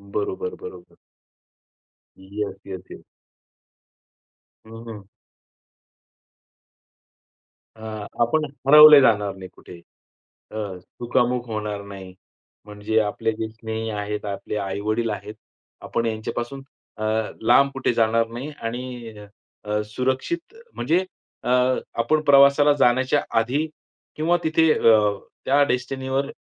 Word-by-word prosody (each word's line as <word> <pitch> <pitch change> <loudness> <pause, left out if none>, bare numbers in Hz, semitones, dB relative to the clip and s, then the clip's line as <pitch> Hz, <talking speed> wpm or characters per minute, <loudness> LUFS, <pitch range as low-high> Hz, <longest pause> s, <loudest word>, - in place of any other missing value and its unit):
बरोबर, 95 -3 -2
बरोबर. 90 -1 -11 1.2
Yes, 100 +1 -5
yes, 95 -2 -7
yes. - - -11 1.6
हं, 110 - -14 0.2
हं. 105 -3 -8 2.7
अ, 110 - -16 0.4
आपण 150 +7 +2 0.2
हरवले 150 +1 +10
जाणार 105 -5 +2
नाही 95 -1 -10
कुठे. 90 - -13 0.7
अ, - - -10 0.2
चुकामुक 120 +5 -1
होणार 105 -2 -4
नाही. 95 -2 -10 0.5
म्हणजे 105 +1 -1
आपले 105 +1 -1
जे 110 - -3
स्नेही 110 0 -5
आहेत, 105 0 -4
आपले 100 +1 -5
आई-वडील 105 +4 -2
आहेत, 105 0 -6 0.5
आपण 115 - -2
यांच्यापासून 120 +4 -4 0.3
अ, 110 - -5 0.4
लांब 120 +5 +5
कुठे 135 -2 0
जाणार 115 0 +2
नाही 120 +5 -6
आणि 120 0 -6 0.5
अ, 105 0 -1
सुरक्षित, 130 - -3 0.2
म्हणजे 170 +3 +1 0.4
अ, - - -3 0.5
आपण 155 +7 +1
प्रवासाला 140 0 +6
जाण्याच्या 130 +3 +3 0.2
आधी 130 +7 0 0.5
किंवा 165 +3 +2
तिथे 160 0 +3
अ, 105 -2 +4 0.3
त्या 140 +2 +4
डेस्टिनीवर 130 +2 -2
115 Hz, 105 wpm, -23 LUFS, 105-135 Hz, 2.7 s, हरवले